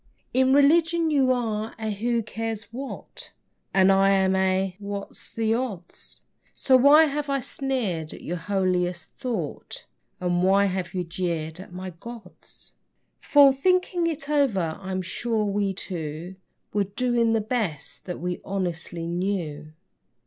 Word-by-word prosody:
In 260 +1 +4
religion 325 +4 +4
you 270 -3 +3
are 225 -3 -1
a 220 -1 -3
who 230 +3 0
cares 225 0 -4
what? 270 +3 -8 0.4
And 190 0 +5
I 195 0 +4
am 190 -1 +3
a 190 0 +1
what's 200 -1 -7
the 225 -1 0
odds? 220 -8 -5 0.3
So 260 - +3
why 285 +5 +8
have 295 -1 -3
I 275 0 +1
sneered 235 - -2
at - - -10
your 175 - -3
holiest 180 -1 -1
thought, 215 - -4 0.3
And 175 -1 0
why 195 +2 +4
have 185 -1 -3
you 180 - 0
jeered 170 -2 -3
at 190 - -10
my 185 +1 -6
gods? 220 +3 -11 0.5
For, 285 -2 +6
thinking 360 +3 +1
it 315 -3 -3
over, 220 - +1
I'm 190 -1 -3
sure 220 +3 -1
we 200 -1 0
two 170 -1 -5 0.4
Were 205 -1 +2
doing 235 +3 +1
the 225 - +3
best 210 - -3
that 180 - -5
we 180 +1 -3
honestly 175 -3 -3
knew. 170 -4 -3
200 Hz, 140 wpm, -25 LUFS, 180-250 Hz, 0.5 s, why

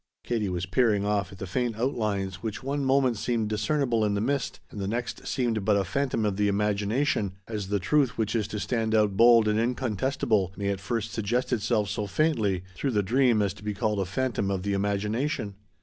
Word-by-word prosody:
Katie 110 -5 -1
was 90 0 -2
peering 100 +1 +2
off 100 -3 0
at 95 - -11
the 95 - -5
faint 120 +4 -1
outlines 105 -7 -1
which 110 +2 -5
one 140 +1 -1
moment 130 -3 +2
seemed 115 -1 -1
discernible 120 +1 +1
in 105 -1 +1
the - - 0
mist 135 +6 -1
and 105 - -7
the 95 - -2
next 120 +3 -4
seemed 115 -5 0
but 105 0 +3
a 100 - +2
phantom 115 +3 -1
of 100 -2 -1
the 105 0 +2
imagination, 105 +2 0
as 105 -4 -4
the 100 +1 +1
truth 125 +7 +1
which 110 0 -1
is 110 -3 0
to 105 -1 -4
stand 110 0 0
out 105 -2 +3
bold 115 0 +6
and 105 0 +2
incontestable 115 -4 0
may 100 0 -1
at 100 -1 -1
first 115 +2 -3
suggest 120 +4 -1
itself 110 -2 +1
so 105 +1 -3
faintly 105 - +1
through 135 - -2
the 105 -5 +1
dream 120 0 +3
as 100 -1 -1
to 105 - -15
be 105 -1 -3
called 105 0 0
a 95 - 0
phantom 100 0 -1
of 95 -2 -2
the 100 0 -1
imagination. 105 +4 -1
105 Hz, 210 wpm, -27 LUFS, 100-120 Hz, -, bold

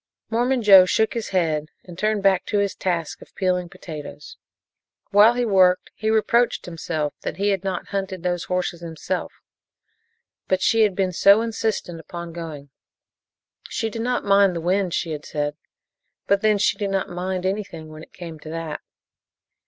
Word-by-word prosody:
Mormon 245 +2 +1
Joe 195 -3 +9
shook 220 +4 +1
his 230 -2 -4
head 160 -5 0 0.2
and 175 - -11
turned 215 +2 0
back 190 -2 +3
to 210 - 0
his 200 -1 +1
task 170 -4 -3
of - - -16
peeling 180 -2 0
potatoes. 150 -3 -9 0.8
While 210 +4 +6
he 245 0 0
worked 185 -4 +3
he 220 - -2
reproached 225 +2 +2
himself 160 -3 -3
that - - -5
he 200 +1 +1
had 195 -2 0
not 190 -3 -3
hunted 190 -3 -4
those 175 -1 -1
horses 180 -2 -2
himself; 170 +2 -4 1.2
but 185 - +2
she 225 +4 +3
had 210 -4 +3
been 185 -1 0
so 200 +5 +6
insistent 220 -6 -2
upon 170 +1 -8
going. 155 -5 -8 1.0
She 225 -2 -2
did 225 - -4
not 245 0 -1
mind 200 -2 +4
the - - -2
wind, 185 +2 +1
she 170 - -2
had 150 -1 -5
said, 145 0 -3 0.7
but 200 0 +2
then 215 -1 +3
she 200 - +1
did 200 -2 -1
not 195 -1 -1
"mind" 185 +1 -3
anything, 190 -5 -3
when 155 0 -10
it - - -14
came 165 -3 -9
to 155 - -10
that. 165 -2 -5
185 Hz, 175 wpm, -23 LUFS, 170-205 Hz, 1.2 s, Joe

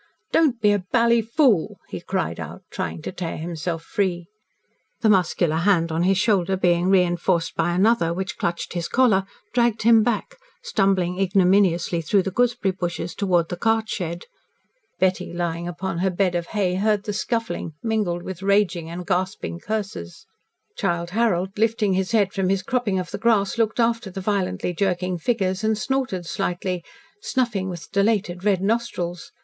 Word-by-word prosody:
"Don't 290 -8 +3
be 210 -2 +4
a 205 - +2
bally 235 -1 +4
fool!" 230 - +2
he - - -6
cried - - -2
out, - - -7
trying 80 -1 -4
to - - -4
tear 180 -3 -4
himself 165 0 -4
free. 175 -2 -1 0.8
The 220 -2 +4
muscular 175 -4 +2
hand 170 -2 +2
on 160 +1 0
his 190 +2 +3
shoulder 195 -3 +2
being 175 -1 +2
reinforced 175 -2 +2
by 175 +1 +1
another, 190 -3 +3
which 190 +2 -4
clutched 170 0 -2
his 170 -1 -2
collar, 210 -7 +3 0.3
dragged 235 -3 +2
him 225 0 +6
back, 240 - -1 0.3
stumbling 190 -3 +1
ignominiously 185 -3 +3
through 190 +4 +2
the 195 - -3
gooseberry 240 -2 +1
bushes 175 -2 -4
towards 175 -4 +1
the 175 - -4
cart 225 +3 +1
shed. 170 -2 -4 0.7
Betty 185 +1 0
lying 170 0 -2
upon 175 0 -4
her 190 +2 +2
bed 185 0 +1
of 170 -1 -2
hay 195 -4 0
heard 210 0 +1
the 210 -1 -3
scuffling, 230 -6 -2
mingled 210 -7 -1
with 190 -1 -7
raging 195 -4 +1
and 175 +1 -6
gasping 185 -2 -2
curses. 195 - -5 0.5
Childe 170 0 -1
Harold, 190 -4 +1
lifting 220 -3 +2
his 185 0 -1
head 205 -4 +2
from 190 -2 0
his 195 -1 +1
cropping 240 -6 0
of 180 -2 -4
the 200 - -5
grass, 220 -1 +2
looked 225 +1 +1
after 230 -2 +1
the 190 +1 -6
violently 185 - -1
jerking 180 -1 -1
figures 190 -1 0
and 220 0 +1
snorted 250 -7 -2
slightly, 180 +1 -2 0.4
snuffing 235 - -1
with 175 -3 -8
dilated 200 -3 +1
red 195 -3 +2
nostrils. 195 -6 -2
190 Hz, 165 wpm, -23 LUFS, 175-215 Hz, 0.8 s, him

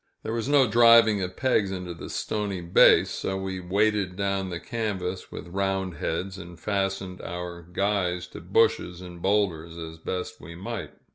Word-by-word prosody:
There 110 - -3
was 115 +3 -2
no 145 -2 +6
driving 115 -2 +6
of 90 0 -4
pegs 115 -7 +2
into 90 -2 -5
this 85 - -7
stony 105 -3 -2
base, 85 0 +5
so 95 - -2
we 95 -1 -4
weighted 100 +1 +1
down 100 -1 -1
the 85 -2 -4
canvas 95 -4 -3
with - - -7
round 95 -2 -1
heads, 95 +5 -3
and 85 -2 -10
fastened 95 -2 -2
our 85 0 -6
guys 90 0 -1
to - - -9
bushes 90 -1 +2
and 90 -1 -10
boulders 85 -5 0
as 80 -1 -8
best 90 +2 -4
we 85 +3 -9
might. 115 +6 -6
95 Hz, 165 wpm, -26 LUFS, 90-100 Hz, -, no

